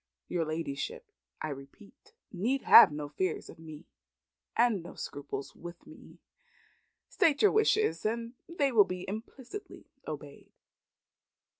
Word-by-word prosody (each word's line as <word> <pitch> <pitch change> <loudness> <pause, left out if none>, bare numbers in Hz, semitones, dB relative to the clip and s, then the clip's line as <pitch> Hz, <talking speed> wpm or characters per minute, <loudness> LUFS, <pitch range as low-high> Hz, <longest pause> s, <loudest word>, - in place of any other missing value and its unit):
Your 170 -2 -1
ladyship, 165 - -4 0.3
I 155 - -2
repeat, 145 - -12 0.2
need 235 +9 -1
have - - +9
no 150 0 -5
fears 150 +6 -3
of - - -17
me 160 0 -11 0.7
and 230 -5 +3
no 170 - -11
scruples 140 -1 -6
with 175 0 -10
me. - - -15 0.9
State 295 0 +2
your 415 - +7
wishes, 430 0 +2
and 230 +2 -2 0.2
they 300 -5 +1
shall 225 -5 +6
be 180 -1 -6
implicitly 245 - -8 0.2
obeyed." 145 -2 -8
195 Hz, 125 wpm, -30 LUFS, -, 0.9 s, have